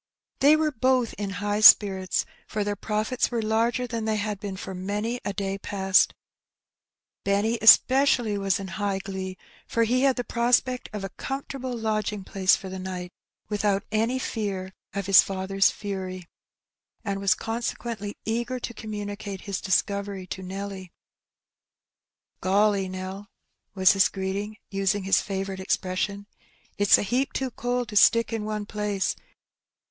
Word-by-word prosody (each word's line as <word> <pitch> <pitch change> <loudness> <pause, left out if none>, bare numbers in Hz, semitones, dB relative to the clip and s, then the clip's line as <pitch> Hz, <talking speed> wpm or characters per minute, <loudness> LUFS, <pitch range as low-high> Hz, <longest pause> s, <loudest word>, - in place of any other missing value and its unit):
They 290 +3 +6
were 310 -1 +1
both 255 -2 +1
in 205 -1 -2 0.2
high 205 0 0
spirits, 190 -4 +6 0.2
for 210 -1 -2
their 205 0 -2
profits 215 +5 -1
were 235 -2 -2
larger 230 +3 +1
than 230 -2 -4
they 220 -1 +1
had 210 -1 -2
been 200 -2 -5
for 190 0 -6
many 205 +6 -3
a - - -2
day 195 0 -3
past. 190 -1 +2 1.1
Benny 210 +4 +1
especially 245 -1 +6
was 195 -1 0
in 195 - -6
high 200 -1 0
glee, 190 -1 -6 0.3
for 230 - +1
he 245 +3 +2
had 270 -1 +3
the 245 - -2
prospect 245 +2 +1
of 210 -2 -5
a 195 - -4
comfortable 270 +1 -5
lodging 215 -2 -2
place 190 -1 +3
for 190 - -8
the 190 0 -6
night, 180 -1 -6 0.4
without 205 -1 0
any 225 +4 +1
fear 195 -6 -3 0.2
of 200 -1 -3
ids 195 -1 +8
father^s 195 +1 +1
fury, 185 -3 -6 0.8
and 200 -1 -2
was 195 -1 +3
consequently 225 -2 -4
eager 240 +3 -2
to 235 - -5
communicate 205 -2 -6
lis 200 -2 -3
discovery 200 0 -1
to 190 - -6
Nelly. 190 -1 -6 1.5
''Golly, 195 0 +2
Nell,'* 190 +2 -6 0.5
was 190 -1 +6
his 195 0 +4
greeting, 200 +2 -4
using 195 0 0
his 195 +1 +3
favourite 195 -1 -4
expression, 190 +2 -2 0.5
''it's 205 -1 +6
a - - -1
heap 255 +6 0
too 265 -1 -2
cold 245 0 -2
to 210 - -8
stick 230 +2 +5
in 220 -2 -2
one 215 -1 -3
place. 210 -2 -2
205 Hz, 150 wpm, -26 LUFS, 195-225 Hz, 1.5 s, ids